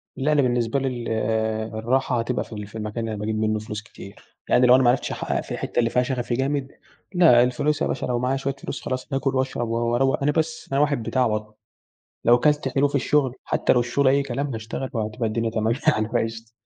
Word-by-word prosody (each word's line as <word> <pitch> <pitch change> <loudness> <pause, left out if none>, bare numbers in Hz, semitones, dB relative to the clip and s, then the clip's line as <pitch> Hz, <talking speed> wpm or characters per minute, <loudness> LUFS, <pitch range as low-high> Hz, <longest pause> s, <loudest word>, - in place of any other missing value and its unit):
لأ 145 +3 0
أنا 150 - +4
بالنسبة 120 0 +1
لي 135 - -1
ال 120 -2 -4 0.7
الراحة 125 +2 +1
هتبقى 120 +2 -1
في - - -12
ال 105 -1 -6
في 110 +2 -10
المكان 105 +1 -4
اللي 115 - -3
أنا 105 - -5
باجيب 110 +1 -2
منه 110 0 +1
فلوس 105 0 -6
كتير، 100 -2 -14
يعني 125 0 +5
لو 125 - +8
أنا 130 - +4
ما 120 - +5
عرفتش 125 - +1
احقق - - -2
في - - -12
الحتة - - -2
اللي 115 -1 +2
فيها 125 +1 +2
شغفي 125 -2 -2
جامد، 135 +1 -1 0.4
لأ 160 -10 +6
الفلوس 145 +5 0
يا - - +2
باشا - - -2
لو 125 -1 -1
معايا 130 +2 0
شوية 135 0 -2
فلوس 140 - -6
خلاص 130 +1 -4
هاكل 135 0 0
وأشرب 130 -2 -1
و - - -1 0.2
وأروَّق 135 +3 +1
أنا 150 - +3
بس 160 0 -2
أنا 140 +1 +2
واحد 145 -6 +1
بتاع 130 +2 +1
بطنه، 105 0 -3 0.7
لو 120 +1 +6
كلت 150 0 +2
حلو 135 +2 +2
في 140 - -4
الشغل 140 -2 +1
حتى - - +1
لو 125 - +3
الشغل 120 +3 +1
أي 140 +1 +4
كلام 140 +1 -3
هاشتغل 115 +4 -5
وهتبقى 110 +1 -2
الدنيا 115 +1 -1
تمام 110 0 0
يعني 110 -7 +3
فقشطة، 115 -1 -3
125 Hz, 230 wpm, -23 LUFS, 115-135 Hz, 0.7 s, لو